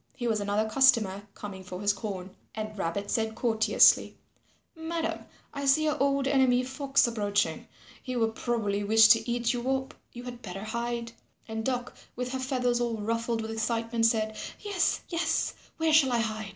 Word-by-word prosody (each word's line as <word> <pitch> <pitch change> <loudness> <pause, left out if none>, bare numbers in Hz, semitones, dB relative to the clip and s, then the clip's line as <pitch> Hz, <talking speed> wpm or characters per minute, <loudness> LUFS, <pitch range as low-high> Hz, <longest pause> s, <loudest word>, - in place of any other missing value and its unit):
He 240 - -5
was 220 -2 +1
another 205 +2 0
customer 215 -6 +3
coming 190 -2 -8
for 180 0 -7
his 205 0 +2
corn. 195 -2 -6 0.2
And 215 0 -5
Rabbit 200 +2 -3
said 220 -1 -1
courteously, 225 -2 +4 0.6
"Madam, 325 0 -3 0.3
I 280 -1 -3
see 275 +3 +4
your 305 -3 0
old 275 -1 +2
enemy 260 -2 +3
Fox 270 +1 +1
approaching. 205 -3 -1 0.3
He 255 -1 -5
will 225 -2 +1
probably 220 -4 -1
wish 220 +1 +6
to 225 - +4
eat 240 0 0
you 245 +1 -3
up; 265 0 -1 0.2
you 245 - -9
had 245 -1 -8
better 195 0 -7
hide." 235 +1 -3 0.4
And 220 0 -4
Duck 250 0 -2 0.2
with 250 0 -4
her 260 - -3
feathers 250 -2 0
all 235 -2 -1
ruffled 230 +2 -1
with 220 0 -5
excitement 225 +1 0
said, 220 -1 0 0.3
"Yes, 400 -4 0
yes, 335 -2 0 0.2
where 320 -1 +1
shall 275 -5 +5
I 240 - +2
hide?" 215 -2 -4
235 Hz, 175 wpm, -28 LUFS, 215-260 Hz, 0.6 s, wish